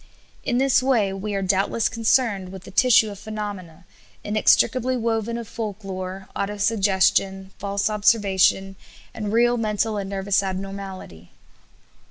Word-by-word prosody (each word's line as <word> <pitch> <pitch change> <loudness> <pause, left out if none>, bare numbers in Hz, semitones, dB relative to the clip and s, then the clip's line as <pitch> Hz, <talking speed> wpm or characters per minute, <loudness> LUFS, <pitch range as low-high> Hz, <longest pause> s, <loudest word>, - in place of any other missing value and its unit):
In 240 - 0
this 265 0 +3
way, 235 -7 +1
we 200 +1 -4
are 195 - -1
doubtless 195 +4 +1
concerned 225 -4 +1
with 190 -1 -10
a - - -11
tissue 220 0 +4
of 200 - -10
phenomena, 200 -6 -7 0.4
inextricably 240 +4 +2
woven 230 0 -1
of 235 -2 -7
folk 215 -2 -6
lore, 190 0 -6
autosuggestion, 195 -2 +1
false 200 0 -1
observation, 195 -3 +2 0.4
and 210 -2 -4
real 240 +2 +3
mental 215 -1 -1
and 195 -1 -4
nervous 195 0 0
abnormality. 190 - -7
200 Hz, 130 wpm, -23 LUFS, 195-225 Hz, 0.4 s, tissue